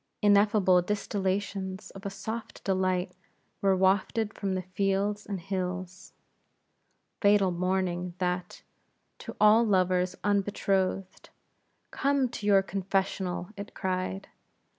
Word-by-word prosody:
Ineffable 205 -3 +5
distillations 195 0 -2
of 195 +1 -7
a - - -2
soft 220 +4 -6
delight 185 -1 0 0.5
were 195 -1 +3
wafted 200 +3 +1
from 195 -2 -2
the 185 - -2
fields 195 +2 -1
and 200 -2 -3
hills. 185 0 -5 1.1
Fatal 200 -2 +4
morning 180 0 -1
that, 180 -1 -3 0.6
to - - -8
all 215 +2 +6
lovers 185 -3 +2
unbetrothed; 195 -2 0 0.6
"Come 275 -2 +1
to 210 -3 -5
your 195 -2 +5
confessional," 190 -1 -2
it 200 0 -8
cried. 185 +1 -3
195 Hz, 105 wpm, -28 LUFS, 185-205 Hz, 1.1 s, all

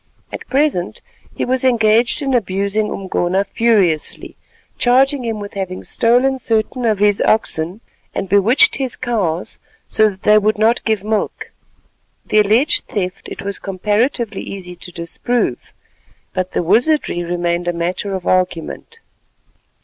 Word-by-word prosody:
At - - -8
present 275 -10 0 0.4
he - - -2
was 260 +1 0
engaged 235 +2 +3
in 270 -1 -1
abusing 200 -1 0
Umgona 190 0 -1
furiously, 200 -9 0 0.4
charging 265 +2 +3
him 225 -2 -3
with 205 0 -8
having 190 -2 -5
stolen 250 +3 +2
certain 230 +2 -1
of 215 -2 +2
his 205 0 +3
oxen 185 -2 +1 0.3
and 195 - -2
bewitched 205 +7 +4
his 260 -3 0
cows 200 -9 -1 0.3
so 215 0 +3
that 190 -1 -12
they 210 0 +6
would 215 +1 +1
not 225 +3 +2
give 220 -4 0
milk. 215 0 -2 0.7
The 215 - +2
alleged 220 +8 +3
theft 185 -2 -4
it - - -8
was 200 0 -4
comparatively 210 +3 -1
easy 185 -2 -7
to 180 +1 -10
disprove, 170 +9 -2 0.6
but 185 0 -3
the - - 0
wizardry 225 - +2
remained 175 0 -2
a - - +2
matter 180 +4 -2
of 185 - -6
argument. 185 - -1
210 Hz, 140 wpm, -18 LUFS, 185-235 Hz, 0.7 s, they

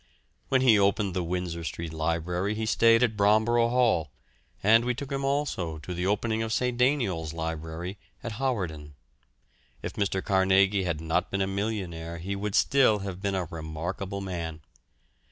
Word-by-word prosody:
When 130 -1 +3
he 115 -5 +6
opened 100 -1 +2
the 90 - -1
Windsor 85 -1 -3
Street 80 -1 -5
Library 85 +5 -1
he 110 +1 -2
stayed 115 +1 +4
at 115 -3 +1
Bromborough 110 +3 +3
Hall, 120 - +2 0.5
and 115 +3 +6
we 125 0 0
took 140 +2 -7
him 135 0 -2
also 135 - -1
to 80 +4 -7
the 90 +1 -2
opening 110 +2 0
of 110 0 -2
St. 125 +1 0
Deiniol's 120 - +1
Library, 80 +3 -5 0.2
at 115 -2 -5
Hawarden. 85 - -2 0.9
If - - -4
Mr. 95 -2 -1
Carnegie 95 0 +3
had 85 -3 -2
not 80 +1 0
been 100 0 0
a - - +1
millionaire 95 -5 -3
he 95 +4 -4
would 100 0 -3
still 130 -6 +4
have 95 -1 -6
been 100 -1 -1
a 95 -2 -1
remarkable 85 +5 -5
man. 85 -4 -5
95 Hz, 165 wpm, -27 LUFS, 85-110 Hz, 0.9 s, he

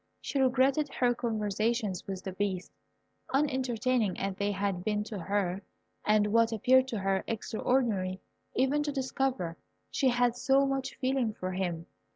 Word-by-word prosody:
She 280 - -2
regretted 265 +3 +3
her 245 -1 +3
conversations 215 -3 -1
with 190 -2 -5
the 190 - -4
Beast, 190 -1 -2 0.6
unentertaining 255 -6 +1
as 195 0 -1
they 200 +1 0
had 195 -2 -1
been 210 +1 0
to 210 -2 -6
her, 190 +1 -1 0.4
and 210 0 +3
what 230 0 +4
appeared 255 +4 +4
to 235 - -3
her 195 -1 0
extraordinary, 215 -4 0 0.4
even 270 +3 +2
to 295 0 -1
discover 260 - -1 0.3
she 270 - +2
had 245 -1 +2
so 270 +2 +3
much 270 -1 -2
feeling 255 -4 0
for 185 -2 -4
him. 175 -3 -2
225 Hz, 150 wpm, -30 LUFS, 195-260 Hz, 0.6 s, what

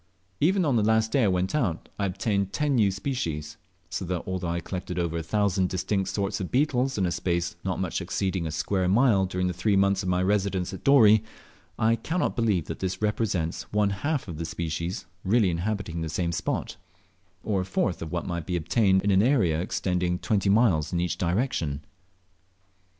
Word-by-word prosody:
Even 185 +3 +3
on 135 -5 +2
the - - +3
last 110 +1 +2
day 130 -3 +3
I - - +4
went 90 0 0
out, 110 - -1
I 100 - +1
obtained 100 +1 -1
10 150 -1 +1
new 110 -6 +4
species; 95 - -3 0.3
so - - -4
that 90 -1 -3
although 95 -1 -3
I 85 +1 -1
collected 90 +1 -5
over 85 -2 -1
a - - -2
thousand 95 +1 +1
distinct 95 +1 -1
sorts 100 +1 -2
of 95 - -4
beetles 130 -2 +1
in 95 - +1
a 85 - 0
space 85 0 -1
not 95 -1 -2
much 95 -2 -2
exceeding 95 -3 -2
a - - -4
square 95 +4 0
mile 100 -1 +4
during 90 0 -2
the 90 - 0
three 95 +4 +1
months 100 0 +3
of 95 - -3
my 90 0 +1
residence 95 -2 0
at 95 - -8
Dorey, 110 -6 +6 0.5
I 115 +1 +3
cannot 165 +10 -1
believe 105 - +1
that - - -6
this 95 -1 -2
represents 100 -6 -1
one 105 -1 +2
half 145 +9 -2
the 85 -3 -5
species 85 +2 -4 0.2
really 100 -1 +3
inhabiting 85 -1 -3
the 80 - -3
same 85 +2 -1
spot, - - -3 0.7
or 100 -3 0
a - - -1
fourth 95 -1 -1
of 80 -1 -5
what 85 - -2
might 85 -2 -4
be 90 - -1
obtained 95 +3 +2
in 100 - +2
an 95 0 +5
area 100 - +2
extending 90 -1 -1
twenty 100 +1 0
miles 100 -8 +3
in 85 - 0
each 90 -1 -1
direction. 85 - -1
95 Hz, 195 wpm, -26 LUFS, 90-110 Hz, 0.7 s, Dorey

